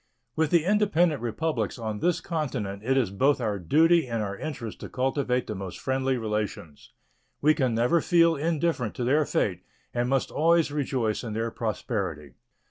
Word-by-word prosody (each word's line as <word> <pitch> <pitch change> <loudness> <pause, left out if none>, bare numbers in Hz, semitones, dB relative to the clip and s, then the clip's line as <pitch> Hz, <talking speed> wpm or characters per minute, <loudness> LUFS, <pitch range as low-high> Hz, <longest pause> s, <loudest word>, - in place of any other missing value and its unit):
With 160 -1 +1
the 170 -1 +3
independent 180 - +2
Republics 120 -1 -2
on 110 -3 -4
this 175 +5 +1
continent 125 - -3
it 135 +3 +1
is 120 -8 +1
both 135 +8 +2
our 105 -4 -1
duty 160 - +4
and 115 -2 -2
our 100 -1 -4
interest 120 -5 -6
to - - -8
cultivate 125 -1 0
the - - -4
most 95 -2 -6
friendly 130 0 0
relations. 105 -9 -4 0.5
We 155 +2 +4
can 130 -7 0
never 125 +9 +3
feel 170 -2 +4
indifferent 160 -6 -1
to 125 - -3
their 145 +5 +3
fate, 90 -3 0 0.3
and 120 0 0
must 135 -1 0
always 165 -1 +3
rejoice 130 -7 -1
in 115 -3 -5
their 115 +1 -2
prosperity. 95 - -3
125 Hz, 170 wpm, -26 LUFS, 110-155 Hz, 0.5 s, duty